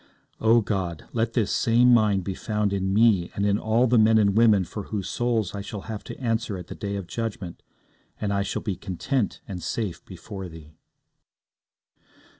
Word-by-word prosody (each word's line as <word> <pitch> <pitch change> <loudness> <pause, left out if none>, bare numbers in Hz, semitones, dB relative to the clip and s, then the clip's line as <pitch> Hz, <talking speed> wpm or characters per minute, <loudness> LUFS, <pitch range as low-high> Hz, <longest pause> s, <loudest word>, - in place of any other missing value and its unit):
O 115 +1 +5
God! 95 -6 -3
let 115 0 0
this 110 -5 +1
same 120 +2 +4
mind 105 -5 +3
be 95 - -3
found 105 0 -1
in 95 -1 -1
me 105 -4 +4
and 100 - 0
in 100 0 +2
all 110 +3 +2
the 120 -1 +4
men 110 +1 +5
and 100 -2 +3
women 110 -4 +5
for 100 +3 -7
whose 100 -3 -4
souls 115 -6 -1
I 100 - -4
shall 100 0 -6
have 110 0 -6
to - - -8
answer 115 -4 -1
at 90 - -8
the - - -8
day 100 -1 -4
of 100 -2 -4
judgment, 105 -1 -5 0.6
and 100 -1 -1
I 100 - +1
shall 100 - -3
be 100 -4 -2
content 105 - -2
and 90 -3 -6
safe 95 -6 -3
before 95 0 -8
Thee. 80 -2 -13
105 Hz, 190 wpm, -25 LUFS, 95-115 Hz, 0.6 s, O